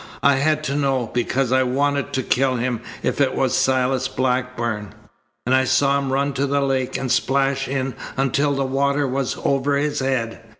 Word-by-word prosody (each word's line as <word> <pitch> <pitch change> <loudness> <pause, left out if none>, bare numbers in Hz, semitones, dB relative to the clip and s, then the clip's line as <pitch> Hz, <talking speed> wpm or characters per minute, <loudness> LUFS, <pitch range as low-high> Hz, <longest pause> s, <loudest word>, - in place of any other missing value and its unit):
I 140 -1 +5
had 155 +2 +1
to 140 -2 -2
know, 135 -5 0
because 125 +1 0
I 130 0 +4
wanted 140 +2 0
to 130 - 0
kill 130 +1 +1
him 120 -1 -2 0.2
if - - 0
it 130 -2 +2
was 130 -2 +1
Silas 130 0 +1
Blackburn. 125 -5 -2 0.5
And 125 - +1
I 130 0 +4
saw 140 +1 +3
him 135 -1 -3
run 140 +1 0
to 140 +2 0
the 140 +1 +1
lake 135 -2 -1
and 130 -2 -3
splash 135 +1 +1
in 135 -1 -2 0.2
until 140 +2 +1
the 135 0 0
water 140 +2 +1
was 130 0 -2
over 140 +1 +1
his 145 +1 -1
head." 130 -4 -2
135 Hz, 185 wpm, -21 LUFS, 130-140 Hz, 0.5 s, I